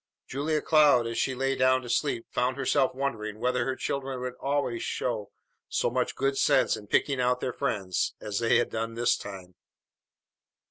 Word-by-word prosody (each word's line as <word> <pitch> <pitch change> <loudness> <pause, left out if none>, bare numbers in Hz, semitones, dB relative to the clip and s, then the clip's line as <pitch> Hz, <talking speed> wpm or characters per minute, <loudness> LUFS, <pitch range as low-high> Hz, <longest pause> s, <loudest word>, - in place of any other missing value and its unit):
Julia 150 +3 -1
Cloud 150 -6 +5
as 115 0 -2
she 130 - 0
lay 135 +1 0
down 130 0 +3
to - - -8
sleep 140 -5 0
found 125 +1 0
herself 135 -1 +1
wondering 110 -6 -3
whether 125 +1 +1
her 130 - -1
children 135 -1 -3
would 125 0 -3
always 135 -4 -1
show 110 -5 -2 0.4
so - - 0
much - - -1
good 135 +1 0
sense - - +3
in 105 - -10
picking 135 +4 +1
out 125 0 +2
their 125 - -3
friends 105 -9 -1
as 105 0 -3
they 115 -1 +3
had - - 0
done 115 0 -3
this 120 0 +2
time. 95 -3 -9
125 Hz, 180 wpm, -28 LUFS, 115-135 Hz, 0.4 s, Cloud